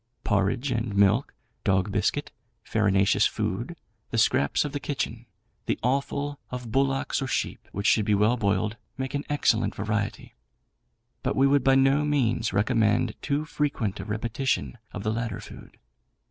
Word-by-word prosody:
Porridge 110 Hz, +7 st, +1 dB
and 115 Hz, -3 st, -2 dB
milk, 100 Hz, +6 st, +3 dB, 0.3 s
dog 95 Hz, -1 st, +2 dB
biscuit, -, -, 0 dB, 0.3 s
farinaceous 100 Hz, -3 st, +3 dB
food, -, -, -3 dB, 0.3 s
the -, -, -2 dB
scraps 70 Hz, -, +3 dB
of 145 Hz, -, -3 dB
the 145 Hz, -, -3 dB
kitchen, 120 Hz, -5 st, -4 dB, 0.4 s
the -, -, +1 dB
offal 140 Hz, +3 st, -1 dB
of 125 Hz, -3 st, -6 dB
bullocks 135 Hz, +2 st, +1 dB
or 135 Hz, -, -2 dB
sheep, -, -, -2 dB
which 100 Hz, +1 st, -4 dB
should 110 Hz, -, +4 dB
be 105 Hz, -1 st, +3 dB
well 105 Hz, +4 st, +3 dB
boiled, 105 Hz, 0 st, 0 dB, 0.2 s
make 130 Hz, +1 st, -3 dB
an 140 Hz, 0 st, -1 dB
excellent 135 Hz, -6 st, +2 dB
variety; 105 Hz, 0 st, -3 dB, 0.9 s
but -, -, -1 dB
we 135 Hz, -, +4 dB
would 140 Hz, -1 st, +4 dB
by 135 Hz, 0 st, +5 dB
no 135 Hz, +2 st, +4 dB
means 120 Hz, -6 st, +1 dB
recommend 110 Hz, +1 st, +2 dB
too 145 Hz, +1 st, -1 dB
frequent 140 Hz, -10 st, -2 dB
a -, -, -4 dB
repetition 115 Hz, +5 st, -2 dB, 0.2 s
of 100 Hz, -, -6 dB
the 110 Hz, -, 0 dB
latter 115 Hz, -3 st, -3 dB
food. -, -, -12 dB
115 Hz, 155 wpm, -26 LUFS, 105-135 Hz, 0.9 s, by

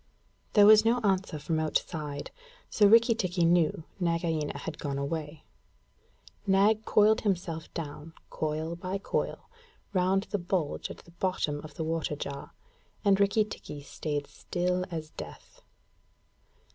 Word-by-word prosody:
There 205 Hz, -1 st, +7 dB
was 215 Hz, 0 st, +8 dB
no 230 Hz, +2 st, +3 dB
answer 190 Hz, -6 st, 0 dB
from 155 Hz, +2 st, -1 dB
outside, 150 Hz, -2 st, -2 dB, 0.4 s
so 210 Hz, -, +5 dB
Rikki 230 Hz, +3 st, +6 dB
tikki 185 Hz, -5 st, 0 dB
knew 165 Hz, -2 st, +3 dB, 0.2 s
Nagaina 165 Hz, -3 st, 0 dB
had 160 Hz, -2 st, -6 dB
gone 140 Hz, -1 st, -3 dB
away. 150 Hz, +1 st, -4 dB, 1.0 s
Nag 205 Hz, +3 st, +4 dB
coiled 215 Hz, +1 st, +4 dB
himself 175 Hz, -5 st, -2 dB
down, 155 Hz, 0 st, -6 dB, 0.2 s
coil 155 Hz, +2 st, -2 dB
by 185 Hz, +3 st, -3 dB
coil, 195 Hz, -, -3 dB, 0.5 s
round 190 Hz, +1 st, +2 dB
the 205 Hz, -, 0 dB
bulge 175 Hz, -3 st, -2 dB
at -, -, -8 dB
the 170 Hz, -, -16 dB
bottom 170 Hz, -5 st, -1 dB
of 150 Hz, -2 st, -11 dB
the 160 Hz, -, -3 dB
water 160 Hz, -1 st, -1 dB
jar, 140 Hz, -1 st, -6 dB, 0.5 s
and 200 Hz, -1 st, +5 dB
Rikki 200 Hz, +2 st, +3 dB
tikki 150 Hz, -8 st, -8 dB
stayed 145 Hz, 0 st, -3 dB
still 180 Hz, +3 st, -2 dB
as 160 Hz, -3 st, -5 dB
death. -, -, -10 dB
170 Hz, 135 wpm, -29 LUFS, 155-195 Hz, 1.0 s, was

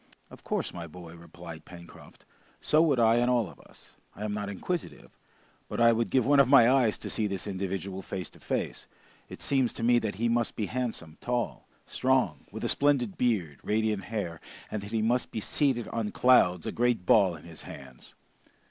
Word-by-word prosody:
"Of -, -, -14 dB
course, -, -, -2 dB
my 85 Hz, -1 st, -6 dB
boy," 85 Hz, +1 st, -11 dB
replied 85 Hz, -1 st, -11 dB
Pencroft, 85 Hz, -1 st, -14 dB, 0.3 s
"so 155 Hz, -, +3 dB
would 145 Hz, -6 st, +3 dB
I 115 Hz, 0 st, +5 dB
and 120 Hz, +1 st, +2 dB
all 120 Hz, -3 st, +2 dB
of -, -, -14 dB
us. -, -, -17 dB, 0.2 s
I 105 Hz, -, -5 dB
am 105 Hz, -, -2 dB
not 105 Hz, -1 st, -3 dB
inquisitive, 170 Hz, -, -5 dB, 0.6 s
but -, -, -4 dB
I 115 Hz, 0 st, +6 dB
would 115 Hz, 0 st, 0 dB
give 130 Hz, -3 st, +2 dB
one 145 Hz, 0 st, +5 dB
of 140 Hz, -, +6 dB
my 130 Hz, -4 st, +7 dB
eyes 125 Hz, -4 st, +3 dB
to -, -, -7 dB
see 110 Hz, -, 0 dB
this 100 Hz, -3 st, -4 dB
individual 95 Hz, -1 st, -4 dB
face 95 Hz, -1 st, -5 dB
to -, -, -18 dB
face! -, -, -3 dB, 0.4 s
It -, -, -10 dB
seems 135 Hz, -3 st, +1 dB
to -, -, -6 dB
me 120 Hz, +1 st, +5 dB
that 110 Hz, -4 st, -3 dB
he 115 Hz, +4 st, 0 dB
must 115 Hz, 0 st, 0 dB
be 105 Hz, -, -1 dB
handsome, 110 Hz, -10 st, -4 dB
tall, 120 Hz, -1 st, -2 dB, 0.2 s
strong, 130 Hz, -11 st, 0 dB
with -, -, -7 dB
a -, -, +1 dB
splendid 140 Hz, -7 st, +1 dB
beard, 95 Hz, -, 0 dB
radiant 105 Hz, -2 st, 0 dB
hair, 100 Hz, -7 st, -4 dB, 0.3 s
and 105 Hz, -, -3 dB
that 100 Hz, +1 st, -9 dB
he 110 Hz, -1 st, 0 dB
must 120 Hz, +3 st, +1 dB
be -, -, -4 dB
seated 125 Hz, +1 st, 0 dB
on 115 Hz, -2 st, -2 dB
clouds, 90 Hz, -9 st, +4 dB
a -, -, -2 dB
great 120 Hz, -5 st, 0 dB
ball 95 Hz, -4 st, +4 dB
in 75 Hz, -, -13 dB
his 85 Hz, -2 st, -10 dB
hands!" 65 Hz, -2 st, -12 dB
110 Hz, 200 wpm, -28 LUFS, 90-120 Hz, 0.6 s, my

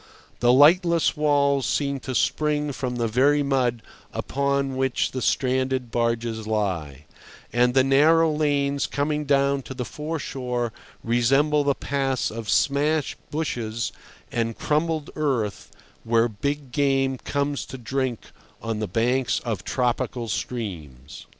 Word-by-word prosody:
The 120 Hz, 0 st, +4 dB
lightless 170 Hz, +5 st, +5 dB
walls 140 Hz, -2 st, +2 dB
seem 140 Hz, -1 st, 0 dB
to 130 Hz, 0 st, -5 dB
spring 150 Hz, +1 st, +1 dB
from 130 Hz, -2 st, -3 dB
the 120 Hz, -1 st, 0 dB
very 140 Hz, +6 st, +3 dB
mud 125 Hz, -4 st, 0 dB, 0.3 s
upon 140 Hz, -1 st, -1 dB
which 130 Hz, -1 st, 0 dB
the 130 Hz, -, -4 dB
stranded 130 Hz, -2 st, 0 dB
barges 115 Hz, -2 st, -1 dB
lie; 85 Hz, -10 st, -2 dB, 0.5 s
and 125 Hz, +1 st, +3 dB
the 130 Hz, -, +6 dB
narrow 155 Hz, +4 st, +4 dB
lanes 145 Hz, -2 st, 0 dB
coming 150 Hz, +1 st, -1 dB
down 140 Hz, 0 st, +2 dB
to 130 Hz, -, -9 dB
the 125 Hz, -1 st, -3 dB
foreshore 130 Hz, -7 st, -3 dB, 0.3 s
resemble 135 Hz, +6 st, +3 dB
the 140 Hz, -1 st, +1 dB
paths 135 Hz, -2 st, -1 dB
of 115 Hz, -1 st, -6 dB
smashed 150 Hz, +1 st, +1 dB
bushes 115 Hz, -7 st, -2 dB, 0.4 s
and 115 Hz, -1 st, -1 dB
crumbled 155 Hz, 0 st, -1 dB
earth 130 Hz, -9 st, -2 dB, 0.3 s
where 115 Hz, 0 st, +3 dB
big 140 Hz, +5 st, -4 dB
game 135 Hz, -1 st, +1 dB
comes 145 Hz, 0 st, -2 dB
to 130 Hz, -, -7 dB
drink 130 Hz, 0 st, -3 dB, 0.3 s
on 115 Hz, -2 st, -3 dB
the 110 Hz, -, -2 dB
banks 120 Hz, +6 st, +1 dB
of 110 Hz, -7 st, -3 dB
tropical 120 Hz, 0 st, -1 dB
streams. 75 Hz, -, -6 dB
130 Hz, 130 wpm, -24 LUFS, 115-145 Hz, 0.5 s, the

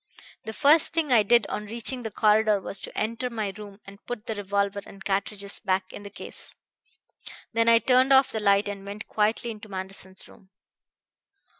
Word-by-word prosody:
"The 220 Hz, -, -5 dB
first 300 Hz, +8 st, +4 dB
thing 315 Hz, -5 st, +1 dB
I 225 Hz, -, +6 dB
did 235 Hz, +1 st, +4 dB
on 210 Hz, -, -5 dB
reaching 235 Hz, +4 st, -1 dB
the 225 Hz, -, -4 dB
corridor 215 Hz, 0 st, +3 dB
was 195 Hz, +1 st, -5 dB
to -, -, -9 dB
enter 230 Hz, +3 st, -2 dB
my 215 Hz, -4 st, -3 dB
room 205 Hz, -1 st, -11 dB
and 200 Hz, +1 st, -14 dB
put 245 Hz, -3 st, -5 dB
the 225 Hz, -, -3 dB
revolver 200 Hz, 0 st, -1 dB
and 195 Hz, 0 st, -14 dB
cartridges 200 Hz, 0 st, -1 dB
back 190 Hz, -2 st, -1 dB
in -, -, -8 dB
the 200 Hz, -, -9 dB
case. 200 Hz, -, -6 dB, 1.0 s
Then 230 Hz, 0 st, +3 dB
I 230 Hz, -, +7 dB
turned 255 Hz, +3 st, +3 dB
off 265 Hz, 0 st, +6 dB
the 220 Hz, -, -2 dB
light 200 Hz, -1 st, +3 dB
and 200 Hz, -1 st, -6 dB
went 200 Hz, +1 st, -8 dB
quietly 220 Hz, +2 st, 0 dB
into 215 Hz, -1 st, -11 dB
Manderson's 190 Hz, -1 st, -7 dB
room. 190 Hz, -, -19 dB
210 Hz, 185 wpm, -26 LUFS, 200-230 Hz, 1.0 s, I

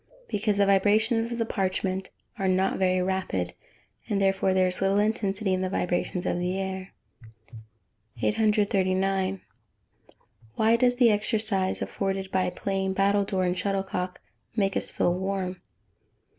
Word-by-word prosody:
_ -, -, -35 dB
Because 210 Hz, -, 0 dB
the 200 Hz, -, +4 dB
vibrations 220 Hz, +4 st, +2 dB
of 235 Hz, -, -3 dB
the 230 Hz, -, 0 dB
parchment 190 Hz, -2 st, -2 dB, 0.3 s
are 195 Hz, -, 0 dB
not 185 Hz, +1 st, +1 dB
very 185 Hz, -1 st, +2 dB
rapid, 180 Hz, -, -2 dB, 0.6 s
therefore 195 Hz, -1 st, +2 dB
there 185 Hz, 0 st, +3 dB
is 180 Hz, -, -4 dB
little 195 Hz, +1 st, +2 dB
intensity 205 Hz, -2 st, 0 dB
in 185 Hz, -, 0 dB
the 185 Hz, -, -1 dB
vibrations 180 Hz, -1 st, -1 dB
of 175 Hz, -, 0 dB
the 180 Hz, +2 st, -1 dB
air. 190 Hz, 0 st, -4 dB, 1.3 s
839. 195 Hz, -, +1 dB, 1.2 s
_Why 225 Hz, +1 st, +3 dB
does 245 Hz, -1 st, +3 dB
the 245 Hz, -2 st, +5 dB
exercise, 210 Hz, -2 st, +1 dB
afforded 195 Hz, -1 st, -3 dB
by 185 Hz, -1 st, +1 dB
playing 190 Hz, +1 st, -2 dB
battledore 195 Hz, -1 st, +1 dB
and 180 Hz, 0 st, 0 dB
shuttlecock, 190 Hz, -2 st, -2 dB, 0.4 s
make 195 Hz, -3 st, +1 dB
us -, -, +1 dB
feel 175 Hz, -, +1 dB
warm? 190 Hz, 0 st, -3 dB
195 Hz, 135 wpm, -26 LUFS, 185-205 Hz, 1.3 s, the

